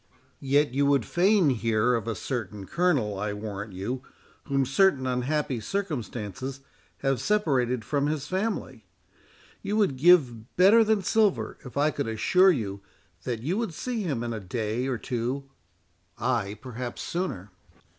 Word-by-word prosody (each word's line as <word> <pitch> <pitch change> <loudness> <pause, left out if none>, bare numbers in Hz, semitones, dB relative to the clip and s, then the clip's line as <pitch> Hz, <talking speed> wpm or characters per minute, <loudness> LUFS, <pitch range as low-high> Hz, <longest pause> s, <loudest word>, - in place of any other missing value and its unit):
"Yet 140 0 +2
you 140 +1 +2
would 140 -5 +3
fain 185 -3 +3
hear 115 0 +1
of 115 -1 -1
a 115 - -1
certain 105 -3 -4
Colonel, 135 - +1
I 105 0 -2
warrant 105 -1 -6
you, 115 +8 -4 0.4
whom 135 -2 +1
certain 135 0 +3
unhappy 130 +1 -1
circumstances 130 - -4 0.4
have 135 -3 0
separated 130 - +1
from 145 +1 0
his 150 -2 -2
family; 185 - -3 0.7
you 210 - -1
would 195 -11 +2
give 130 -8 +4
better 205 +6 +7
than 215 -2 +1
silver 215 0 +1
if 125 +1 -9
I 150 +2 +3
could 125 - -3
assure 180 - +4
you 100 - -1 0.4
that 120 -3 -3
you 180 - 0
would 215 -9 -3
see 245 +2 -3
him 140 - -2
in 120 -1 -3
a 110 - -4
day 110 +5 -2
or 130 -3 -1
two—ay, 115 -4 -4
perhaps, 125 -1 -6
sooner." 135 - -3
130 Hz, 145 wpm, -27 LUFS, 110-160 Hz, 0.7 s, better